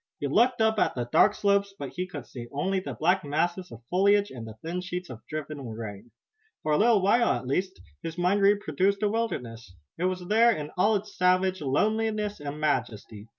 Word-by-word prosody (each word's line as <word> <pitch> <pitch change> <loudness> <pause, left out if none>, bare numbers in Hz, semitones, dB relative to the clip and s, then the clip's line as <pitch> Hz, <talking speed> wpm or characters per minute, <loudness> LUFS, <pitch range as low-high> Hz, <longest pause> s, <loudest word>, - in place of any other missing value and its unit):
He - - -3
looked 235 - +3
up 220 -1 +3
at - - +1
the 120 -1 -2
dark 200 - +4
slopes, 200 -1 +1
but 140 -5 -5
he 180 +5 -4
could 145 -8 -8
see 120 +1 -9
only 190 +7 0
the 185 - -6
black 180 +4 +2
masses 175 +5 -1
of 115 +1 -11
foliage 200 +2 +3
and 115 -3 -8
the 110 - -9
thin 170 +3 -3
sheets 180 -3 -5
of 120 -2 -9
driven 155 -2 -5
rain. 110 0 -7 0.5
For 155 - -1
a 150 - +4
little 220 -2 +4
while, 235 +5 +4
at - - -4
least, 140 - -2 0.2
his 165 0 -6
mind 180 +3 +2
reproduced 200 -1 +2
the 210 - +2
wilderness. 115 - -4 0.2
It 180 - 0
was 185 -1 -2
there 225 +4 +5
in 150 -8 -4
all 210 +4 +3
its 205 +1 -4
savage 185 0 +2
loneliness 210 +8 0
and 145 +1 -6
majesty. 115 -7 -2
180 Hz, 200 wpm, -27 LUFS, 140-200 Hz, 0.5 s, there